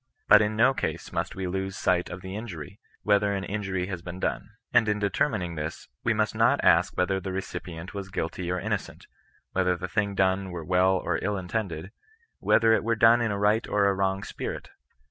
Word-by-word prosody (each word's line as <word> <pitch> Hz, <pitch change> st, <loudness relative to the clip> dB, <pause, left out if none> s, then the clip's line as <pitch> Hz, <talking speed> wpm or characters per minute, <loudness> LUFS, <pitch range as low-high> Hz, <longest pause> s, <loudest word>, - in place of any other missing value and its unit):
But -, -, +8 dB
in 105 Hz, 0 st, 0 dB
no 125 Hz, +5 st, +4 dB
case -, -, -4 dB
must -, -, -2 dB
we 95 Hz, -, -3 dB
lose 95 Hz, +1 st, -3 dB
sight 90 Hz, -2 st, +1 dB
of 90 Hz, -, -7 dB
the 95 Hz, +1 st, -7 dB
inquiry, 100 Hz, -3 st, -7 dB, 0.2 s
whether 100 Hz, 0 st, +3 dB
an 95 Hz, -, -3 dB
injury 95 Hz, -3 st, -2 dB
has 90 Hz, -2 st, -5 dB
been 90 Hz, +1 st, -7 dB
done. -, -, -2 dB, 0.2 s
Ajid 120 Hz, -2 st, +5 dB
in 105 Hz, 0 st, +1 dB
determining 100 Hz, -, 0 dB
this, 75 Hz, 0 st, -6 dB
we -, -, +2 dB
must -, -, +1 dB
not -, -, +3 dB
ask -, -, +4 dB
whether 95 Hz, +1 st, +1 dB
the 95 Hz, +1 st, -5 dB
recipient 90 Hz, -2 st, -6 dB
were 100 Hz, -, -3 dB
guilty 85 Hz, 0 st, -3 dB
or 90 Hz, -, -1 dB
innocent, -, -, -4 dB, 0.5 s
whether 90 Hz, -1 st, +1 dB
the 90 Hz, -, -4 dB
thing 100 Hz, +1 st, -1 dB
done 95 Hz, 0 st, +1 dB
were 85 Hz, -3 st, -6 dB
well 90 Hz, +2 st, +3 dB
or 90 Hz, -2 st, -1 dB
ill 105 Hz, +1 st, 0 dB
intended, 90 Hz, -2 st, -4 dB, 0.5 s
whether 115 Hz, 0 st, +4 dB
it -, -, +2 dB
were 115 Hz, +1 st, +1 dB
done 115 Hz, +2 st, +6 dB
in 115 Hz, -, +1 dB
a 100 Hz, -, -1 dB
right 105 Hz, +3 st, +2 dB
or 100 Hz, -1 st, +2 dB
a 100 Hz, -, +3 dB
wrong 95 Hz, 0 st, 0 dB
spirit. -, -, -6 dB
95 Hz, 205 wpm, -27 LUFS, 90-105 Hz, 0.5 s, But